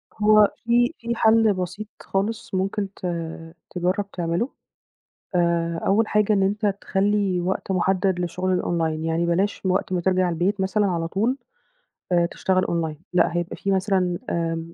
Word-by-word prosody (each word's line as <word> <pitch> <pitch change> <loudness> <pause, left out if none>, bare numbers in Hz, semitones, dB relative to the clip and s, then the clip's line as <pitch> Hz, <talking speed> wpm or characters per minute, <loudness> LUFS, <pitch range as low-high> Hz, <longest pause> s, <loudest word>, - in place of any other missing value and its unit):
هو 215 -1 +5
في 240 +4 +3
في 235 0 -3
حَل 220 -1 +4
بسيط 190 +3 -5
خالص 205 +3 -3
ممكن 195 +2 -1
ت - - -18 0.7
تجرّب 185 +3 -1
تعمله، 175 +8 -1 0.9
آآ 170 -1 +1
أول 215 +3 +3
حاجة 210 0 +2
إن 195 - +2
أنت 205 +3 0 0.2
تخلّي 195 -2 +1
وقت 190 +2 -2
مُحدَّد 185 0 +1
لشُغل 180 +1 -1
الOnline، 160 -2 -1
يعني 165 +1 0
بلاش 185 +4 0
وقت 185 0 0
ما 180 - 0
ترجع 185 0 +2
البيت 185 +4 0
مثلًا 205 +2 +1
على 170 -2 -1
طول 225 +10 0 0.7
آآ 175 -1 +4
تشتغل 185 +1 0
Online 160 -3 -2 0.2
لأ، 175 -1 +3
هيبقى 175 -1 -2
فيه 195 - -2
مثلًا 185 -2 +1
آمم 165 0 -2
185 Hz, 150 wpm, -23 LUFS, 175-205 Hz, 0.9 s, هو